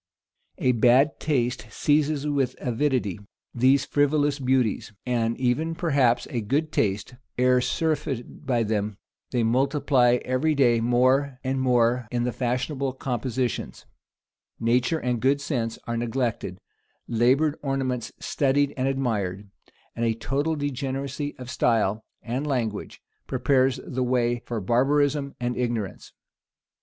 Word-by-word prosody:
A 130 Hz, -, +2 dB
bad 125 Hz, +5 st, +4 dB
taste 125 Hz, -6 st, -1 dB
seizes 150 Hz, +3 st, +1 dB
with 140 Hz, -4 st, 0 dB
avidity 125 Hz, -6 st, 0 dB, 0.3 s
these 130 Hz, +3 st, +3 dB
frivolous 145 Hz, 0 st, +1 dB
beauties, 125 Hz, -5 st, 0 dB
and 115 Hz, -2 st, 0 dB
even 145 Hz, +6 st, 0 dB
perhaps 140 Hz, -8 st, +2 dB
a 120 Hz, -, -1 dB
good 145 Hz, +9 st, -1 dB
taste, 100 Hz, -3 st, -1 dB, 0.2 s
ere 125 Hz, 0 st, +4 dB
surfeited 145 Hz, -2 st, -2 dB
by 120 Hz, -3 st, +2 dB
them: 105 Hz, -2 st, -2 dB, 0.3 s
they 120 Hz, -2 st, 0 dB
multiply 130 Hz, +1 st, +3 dB
every 145 Hz, +5 st, +1 dB
day 120 Hz, -4 st, +4 dB
more 130 Hz, +3 st, +2 dB
and 130 Hz, 0 st, -1 dB
more 120 Hz, -1 st, +2 dB
in 120 Hz, +1 st, -1 dB
the 125 Hz, -, 0 dB
fashionable 130 Hz, +3 st, -2 dB
compositions: 125 Hz, -1 st, -3 dB, 0.7 s
nature 120 Hz, +6 st, +2 dB
and 125 Hz, -5 st, -2 dB
good 140 Hz, +2 st, +3 dB
sense 120 Hz, -6 st, -2 dB
are 120 Hz, 0 st, -2 dB
neglected: 115 Hz, -5 st, -2 dB, 0.5 s
labored 130 Hz, +6 st, +2 dB
ornaments 135 Hz, -4 st, -2 dB
studied 140 Hz, 0 st, +1 dB
and 130 Hz, 0 st, 0 dB
admired: 105 Hz, -8 st, -2 dB, 0.4 s
and 115 Hz, -, -2 dB
a 115 Hz, -1 st, +1 dB
total 140 Hz, +7 st, -1 dB
degeneracy 140 Hz, 0 st, -3 dB
of 125 Hz, -1 st, -9 dB
style 110 Hz, -4 st, +1 dB, 0.2 s
and 130 Hz, +5 st, -3 dB
language 115 Hz, -7 st, -3 dB, 0.2 s
prepares 130 Hz, -2 st, +2 dB
the 130 Hz, 0 st, -3 dB
way 120 Hz, -1 st, +1 dB
for 120 Hz, -2 st, -2 dB
barbarism 140 Hz, +6 st, +1 dB
and 120 Hz, 0 st, -2 dB
ignorance. 115 Hz, -6 st, -3 dB
125 Hz, 125 wpm, -25 LUFS, 120-140 Hz, 0.7 s, bad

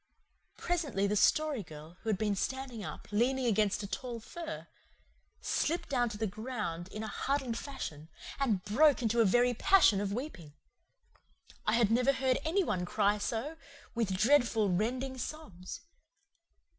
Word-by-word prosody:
Presently 300 Hz, -, -1 dB
the 205 Hz, +1 st, +1 dB
Story 300 Hz, +4 st, +3 dB
Girl, 155 Hz, -1 st, -11 dB
who 225 Hz, -, -4 dB
had 210 Hz, -, +2 dB
been 210 Hz, 0 st, 0 dB
standing 260 Hz, 0 st, -3 dB
up, -, -, -7 dB
leaning 250 Hz, +5 st, +1 dB
against 210 Hz, -2 st, +2 dB
a -, -, -4 dB
tall 240 Hz, +3 st, -5 dB
fir, 325 Hz, +8 st, -7 dB, 0.8 s
slipped 335 Hz, +3 st, -1 dB
down 245 Hz, -4 st, +1 dB
to 210 Hz, -, -6 dB
the 220 Hz, -, -1 dB
ground 210 Hz, -5 st, -4 dB
in 215 Hz, +3 st, -6 dB
a -, -, -4 dB
huddled 265 Hz, 0 st, -1 dB
fashion 165 Hz, -, -6 dB, 0.3 s
and 220 Hz, -9 st, +1 dB
broke 270 Hz, +6 st, +4 dB
into 230 Hz, +1 st, +3 dB
a -, -, +5 dB
very 245 Hz, +5 st, +4 dB
passion 240 Hz, -, +5 dB
of 200 Hz, -1 st, -2 dB
weeping. 205 Hz, -, -6 dB, 1.1 s
I 215 Hz, -, +3 dB
had 230 Hz, -2 st, +3 dB
never 250 Hz, +4 st, +4 dB
heard 260 Hz, -1 st, +1 dB
any 350 Hz, +5 st, +2 dB
one 190 Hz, -, -1 dB
cry 205 Hz, +3 st, +1 dB
so, 240 Hz, +9 st, -3 dB, 0.4 s
with 215 Hz, -5 st, 0 dB
dreadful, 230 Hz, -3 st, +3 dB
rending 255 Hz, +7 st, -1 dB
sobs. 200 Hz, -, -7 dB
230 Hz, 155 wpm, -32 LUFS, 205-265 Hz, 1.1 s, a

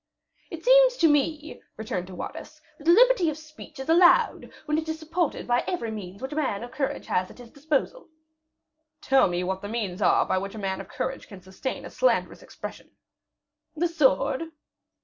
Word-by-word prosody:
"It -, -, -9 dB
seems -, -, +6 dB
to 330 Hz, -, +4 dB
me," 300 Hz, +1 st, 0 dB, 0.2 s
returned 185 Hz, -5 st, -4 dB
De 185 Hz, -, -10 dB
Wardes, -, -, -8 dB, 0.2 s
"that 300 Hz, -, -11 dB
liberty 445 Hz, -1 st, +5 dB
of 305 Hz, -, -4 dB
speech 310 Hz, -1 st, -13 dB
is 265 Hz, -, -6 dB
allowed, 350 Hz, +8 st, +4 dB
when 300 Hz, 0 st, 0 dB
it 320 Hz, 0 st, -6 dB
is 315 Hz, -, -2 dB
supported 325 Hz, +1 st, -2 dB
by 245 Hz, 0 st, +2 dB
every 235 Hz, -11 st, -2 dB
means 200 Hz, 0 st, -8 dB
which 265 Hz, -, -4 dB
a -, -, -5 dB
man 260 Hz, -9 st, -1 dB
of 240 Hz, -, -8 dB
courage 275 Hz, -2 st, -3 dB
has 185 Hz, 0 st, -1 dB
at -, -, -14 dB
his 240 Hz, -2 st, -13 dB
disposal." 305 Hz, -, -2 dB, 0.9 s
"Tell 270 Hz, -5 st, +4 dB
me 175 Hz, 0 st, -2 dB
what 190 Hz, +1 st, -3 dB
the 205 Hz, -, -6 dB
means 210 Hz, -4 st, -3 dB
are -, -, +4 dB
by 185 Hz, -, 0 dB
which 195 Hz, +2 st, -6 dB
a -, -, -7 dB
man 195 Hz, -2 st, -3 dB
of -, -, -13 dB
courage 265 Hz, 0 st, -4 dB
can 200 Hz, -4 st, -11 dB
sustain 190 Hz, +8 st, -5 dB
a -, -, -9 dB
slanderous -, -, 0 dB
expression." -, -, -9 dB, 0.9 s
"The 340 Hz, +3 st, +1 dB
sword." 290 Hz, -, +2 dB
275 Hz, 190 wpm, -26 LUFS, 205-325 Hz, 0.9 s, seems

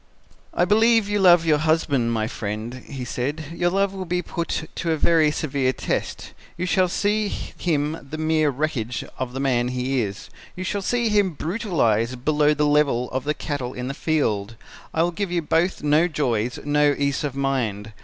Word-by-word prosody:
"'I 175 Hz, -, +3 dB
believe 220 Hz, +2 st, +4 dB
you 205 Hz, 0 st, 0 dB
love 175 Hz, -3 st, +6 dB
your 155 Hz, -2 st, +3 dB
husband, 150 Hz, -6 st, +1 dB
my 110 Hz, -2 st, 0 dB
friend,' 110 Hz, +3 st, -5 dB
he 135 Hz, -3 st, -6 dB
said; 140 Hz, +6 st, -3 dB
'your 175 Hz, +1 st, +1 dB
love 195 Hz, +1 st, +1 dB
will 190 Hz, -1 st, -5 dB
be 180 Hz, +1 st, -1 dB
put 165 Hz, -2 st, -3 dB
to 170 Hz, -, -3 dB
a 160 Hz, -, +1 dB
very 160 Hz, 0 st, +4 dB
severe 140 Hz, -3 st, 0 dB
test. -, -, -3 dB, 0.2 s
You 175 Hz, -, -2 dB
shall 185 Hz, 0 st, +3 dB
see 210 Hz, +3 st, 0 dB
him 155 Hz, -5 st, -2 dB
the 155 Hz, -, -5 dB
mere 155 Hz, -1 st, +2 dB
wreckage 130 Hz, -4 st, -2 dB
of 130 Hz, -1 st, -3 dB
the 135 Hz, -, -4 dB
man 125 Hz, -3 st, +1 dB
he 125 Hz, +1 st, -1 dB
is. 100 Hz, -1 st, -5 dB, 0.2 s
You 185 Hz, -, -5 dB
shall 200 Hz, +2 st, -2 dB
see 235 Hz, +3 st, 0 dB
him 205 Hz, -4 st, +2 dB
brutalized 130 Hz, -, 0 dB
below 150 Hz, 0 st, +3 dB
the 150 Hz, +1 st, +2 dB
level 145 Hz, -5 st, +2 dB
of 130 Hz, +1 st, -3 dB
the 150 Hz, +1 st, 0 dB
cattle 135 Hz, -4 st, -4 dB
in 125 Hz, +1 st, -4 dB
the -, -, -3 dB
field. 115 Hz, -10 st, -1 dB, 0.4 s
I 160 Hz, -, +2 dB
will 175 Hz, -, +1 dB
give 185 Hz, +2 st, -3 dB
you 175 Hz, -2 st, 0 dB
both 165 Hz, +4 st, +1 dB
no 150 Hz, +3 st, +4 dB
joys, 125 Hz, -7 st, -1 dB
no 145 Hz, 0 st, +3 dB
ease 140 Hz, 0 st, 0 dB
of 140 Hz, -3 st, -3 dB
mind. 115 Hz, -6 st, -2 dB
150 Hz, 190 wpm, -23 LUFS, 125-175 Hz, 0.4 s, love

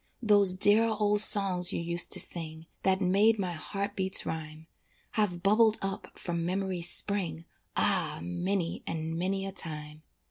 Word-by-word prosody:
Those 205 Hz, -4 st, +4 dB
dear 205 Hz, +4 st, +3 dB
old 210 Hz, -1 st, +1 dB
songs 195 Hz, -4 st, +7 dB
you -, -, -5 dB
used 170 Hz, +1 st, +2 dB
to -, -, +1 dB
sing, 160 Hz, -1 st, -1 dB, 0.2 s
That 190 Hz, 0 st, -1 dB
made 200 Hz, +4 st, +1 dB
my 185 Hz, -3 st, -4 dB
heart 200 Hz, +5 st, -6 dB
beats 190 Hz, 0 st, +1 dB
rhyme, 155 Hz, 0 st, -8 dB, 0.5 s
Have 185 Hz, -5 st, -3 dB
bubbled 215 Hz, +2 st, +2 dB
up 195 Hz, 0 st, -7 dB
from 170 Hz, -1 st, -5 dB
memory's 185 Hz, -1 st, -3 dB
spring, 170 Hz, -6 st, -3 dB, 0.3 s
Ah! -, -, +1 dB
many 170 Hz, -, -4 dB
and 160 Hz, 0 st, -6 dB
many 190 Hz, +3 st, -4 dB
a 195 Hz, -, -6 dB
time. 155 Hz, -4 st, -6 dB
185 Hz, 150 wpm, -27 LUFS, 165-200 Hz, 0.5 s, songs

